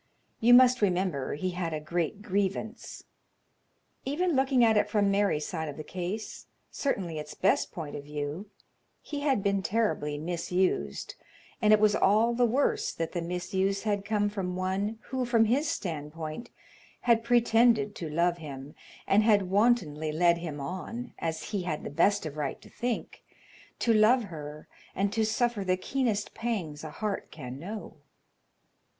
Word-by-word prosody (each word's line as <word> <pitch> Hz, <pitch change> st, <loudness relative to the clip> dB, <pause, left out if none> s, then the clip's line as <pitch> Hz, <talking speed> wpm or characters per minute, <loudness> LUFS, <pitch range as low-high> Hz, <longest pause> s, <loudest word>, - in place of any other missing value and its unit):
You 240 Hz, +2 st, +7 dB
must 255 Hz, -1 st, +6 dB
remember 180 Hz, -9 st, 0 dB
he 185 Hz, +5 st, -2 dB
had 175 Hz, -3 st, -3 dB
a -, -, -3 dB
great 170 Hz, +5 st, -2 dB
grievance. 205 Hz, +3 st, -3 dB, 1.0 s
Even 325 Hz, +5 st, 0 dB
looking 265 Hz, -2 st, +4 dB
at 220 Hz, -1 st, +4 dB
it 210 Hz, 0 st, +2 dB
from 205 Hz, -1 st, +2 dB
Mary's 200 Hz, -7 st, +1 dB
side 160 Hz, -4 st, -4 dB
of 145 Hz, -, -8 dB
the 155 Hz, -, -6 dB
case, 185 Hz, +6 st, -5 dB, 0.2 s
certainly 180 Hz, -, -2 dB
its 150 Hz, 0 st, -8 dB
best 195 Hz, -, +2 dB
point 155 Hz, -4 st, -6 dB
of 145 Hz, -, -6 dB
view, 150 Hz, +6 st, -5 dB, 0.5 s
he 290 Hz, -, -5 dB
had 275 Hz, -8 st, +1 dB
been 200 Hz, -1 st, +1 dB
terribly 190 Hz, -9 st, 0 dB
misused, 170 Hz, -, -1 dB, 0.5 s
and 210 Hz, -, +4 dB
it 215 Hz, -, +7 dB
was 210 Hz, -1 st, +4 dB
all 220 Hz, +4 st, +3 dB
the 240 Hz, 0 st, +3 dB
worse 350 Hz, -, +1 dB
that 165 Hz, -1 st, -4 dB
the 175 Hz, -, -2 dB
misuse 190 Hz, +3 st, -1 dB
had 205 Hz, -2 st, 0 dB
come 205 Hz, 0 st, +1 dB
from 195 Hz, -3 st, -3 dB
one 190 Hz, +4 st, -1 dB
who, 260 Hz, 0 st, -1 dB
from 235 Hz, -2 st, +3 dB
his 270 Hz, +8 st, +1 dB
standpoint, 155 Hz, +4 st, -5 dB, 0.5 s
had 230 Hz, -2 st, +3 dB
pretended 230 Hz, -2 st, +4 dB
to 165 Hz, -, -5 dB
love 170 Hz, +3 st, +1 dB
him, 140 Hz, -2 st, -8 dB, 0.3 s
and 200 Hz, +2 st, +4 dB
had 205 Hz, -4 st, +3 dB
wantonly 190 Hz, -9 st, +2 dB
led 170 Hz, +2 st, +3 dB
him 160 Hz, -4 st, -5 dB
on, 190 Hz, -, -5 dB
as 160 Hz, +2 st, -3 dB
he 205 Hz, -3 st, -1 dB
had 165 Hz, -4 st, -3 dB
the -, -, -5 dB
best 195 Hz, +6 st, +2 dB
of 155 Hz, -1 st, -6 dB
right 145 Hz, -3 st, -3 dB
to -, -, -15 dB
think, 240 Hz, -1 st, -3 dB, 0.6 s
to 230 Hz, -, +2 dB
love 225 Hz, +3 st, +5 dB
her, 150 Hz, -5 st, -8 dB, 0.3 s
and 200 Hz, +1 st, 0 dB
to 225 Hz, -, +1 dB
suffer 220 Hz, -1 st, 0 dB
the 185 Hz, -1 st, +1 dB
keenest 220 Hz, -1 st, -1 dB
pangs 190 Hz, -11 st, -3 dB
a 155 Hz, -, -5 dB
heart 205 Hz, +5 st, -4 dB
can 130 Hz, -3 st, -8 dB
know. 210 Hz, +7 st, -7 dB
195 Hz, 165 wpm, -29 LUFS, 165-225 Hz, 1.0 s, You